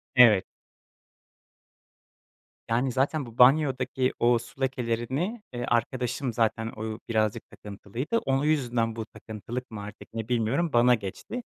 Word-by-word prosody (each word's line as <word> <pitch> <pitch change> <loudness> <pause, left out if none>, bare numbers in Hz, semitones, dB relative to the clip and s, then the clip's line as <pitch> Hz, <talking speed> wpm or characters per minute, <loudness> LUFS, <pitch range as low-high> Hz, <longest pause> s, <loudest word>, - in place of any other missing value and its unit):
Evet. 110 -6 +7 2.2
Yani, 125 +3 +1
zaten 140 +3 0
bu 120 -1 -13
banyodaki 130 -1 +4
o 120 0 +4
su 120 +3 -13
lekelerini, 130 - -1
eee, 120 - -3
arkadaşım 125 +1 -1
zaten 110 -1 0
o 110 0 -4
birazcık 110 0 0
takıntılıydı, 110 - -4
onun 135 -7 0
yüzünden 120 -7 +1
bu 110 -1 -4
takıntılık 115 +3 -7
mı 105 -2 -6
artık 105 +2 -11
ne 115 -1 -4
bilmiyorum, 125 +7 0
bana 120 +1 +6
geçti. 110 - -6
120 Hz, 125 wpm, -27 LUFS, 115-135 Hz, 2.2 s, Evet